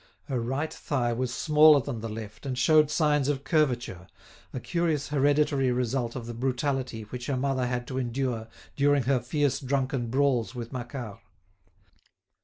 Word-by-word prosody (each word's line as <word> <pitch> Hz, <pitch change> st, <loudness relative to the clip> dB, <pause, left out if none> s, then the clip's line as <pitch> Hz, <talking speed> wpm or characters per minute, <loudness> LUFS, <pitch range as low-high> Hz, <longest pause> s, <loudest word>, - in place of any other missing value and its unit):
Her 130 Hz, -5 st, -2 dB
right 135 Hz, +7 st, -2 dB
thigh 120 Hz, -5 st, -1 dB
was 125 Hz, +1 st, -2 dB
smaller 150 Hz, +1 st, +6 dB
than 125 Hz, -3 st, -4 dB
the 115 Hz, +1 st, -5 dB
left 110 Hz, +4 st, -8 dB
and 130 Hz, -2 st, -3 dB
showed 155 Hz, +3 st, +4 dB
signs 150 Hz, -3 st, +2 dB
of 140 Hz, -2 st, -1 dB
curvature, 125 Hz, -, 0 dB, 0.4 s
a 130 Hz, -, -4 dB
curious 160 Hz, -2 st, -1 dB
hereditary 145 Hz, -2 st, +2 dB
result 125 Hz, -1 st, -1 dB
of 120 Hz, -3 st, -5 dB
the 120 Hz, -, -6 dB
brutality 130 Hz, -1 st, -2 dB
which 125 Hz, +3 st, -7 dB
her 140 Hz, -, 0 dB
mother 130 Hz, -1 st, 0 dB
had 125 Hz, 0 st, -2 dB
to 130 Hz, -1 st, -2 dB
endure 120 Hz, -2 st, -2 dB, 0.3 s
during 145 Hz, -1 st, +3 dB
her 130 Hz, +1 st, +2 dB
fierce 145 Hz, +3 st, 0 dB
drunken 135 Hz, -2 st, -1 dB
brawls 130 Hz, -2 st, +1 dB
with 120 Hz, +1 st, -6 dB
Macquart. 120 Hz, -4 st, -6 dB
130 Hz, 160 wpm, -27 LUFS, 120-145 Hz, 0.4 s, smaller